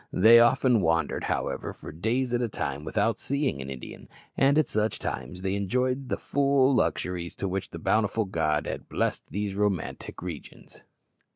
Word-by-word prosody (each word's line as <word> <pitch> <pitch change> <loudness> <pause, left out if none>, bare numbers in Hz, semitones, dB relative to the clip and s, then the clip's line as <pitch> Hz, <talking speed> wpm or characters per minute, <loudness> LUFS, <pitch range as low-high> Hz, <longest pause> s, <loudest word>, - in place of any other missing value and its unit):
They 115 +4 +7
often 120 -1 +4
wandered, 80 -1 0
however, - - -2
for - - -10
days 115 +10 -1
at 120 - +1
a 120 - 0
time 70 -7 -4
without 105 +6 0
seeing 140 - -1
an 65 - -7
Indian, 65 -2 -9 0.3
and 140 +2 +4
at 155 - +3
such 105 0 0
times 75 +10 -5
they 95 0 0
enjoyed 125 +7 -1
to - - +1
the - - -12
full 140 -1 +2
the - - +4
luxuries 90 -1 -3
with 95 - -2
which 95 0 -3
a - - -6
bountiful 110 +5 +1
God 80 -5 0
had - - -6
blessed - - -1
these 100 +4 -3
romantic 100 -4 -2
regions. 85 -5 -9
105 Hz, 180 wpm, -27 LUFS, 90-125 Hz, 0.3 s, They